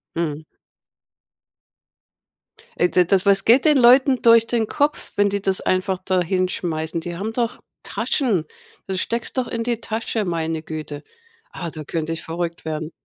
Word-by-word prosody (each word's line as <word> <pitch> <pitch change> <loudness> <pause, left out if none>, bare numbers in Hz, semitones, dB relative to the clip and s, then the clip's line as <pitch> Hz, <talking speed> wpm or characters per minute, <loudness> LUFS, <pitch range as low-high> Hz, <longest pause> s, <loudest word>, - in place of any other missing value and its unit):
Mhm. 155 -2 -3 2.4
Ey, 175 - +4
d 180 -1 +4
das 190 +1 +2
was 200 -1 +4
geht 250 +6 +4
den 300 -2 +5
Leuten 260 +1 +5
durch 230 -1 +6
den 230 -3 0
Kopf, 290 +1 -1
wenn 205 0 +3
die 200 0 -1
das 195 -1 +1
einfach 185 0 0
da 185 -2 +1
hinschmeißen? 175 -3 -1
Die 175 0 -5
haben 220 +3 -4
doch 235 -1 -1 0.2
Taschen! 210 - 0 0.4
Dann 190 -1 -3
steckst 235 +5 -1
doch 245 - -2
in 230 -1 -3
die 235 -1 -2
Tasche, 220 -1 -2
meine 165 -2 -2
Güte. 155 -2 -7 0.5
Ah, 170 - -6
da 155 -1 -7
könnte 160 +2 -3
ich 160 - -5
verrückt 170 0 -4
werden. 155 +1 -4
185 Hz, 160 wpm, -21 LUFS, 165-230 Hz, 2.4 s, durch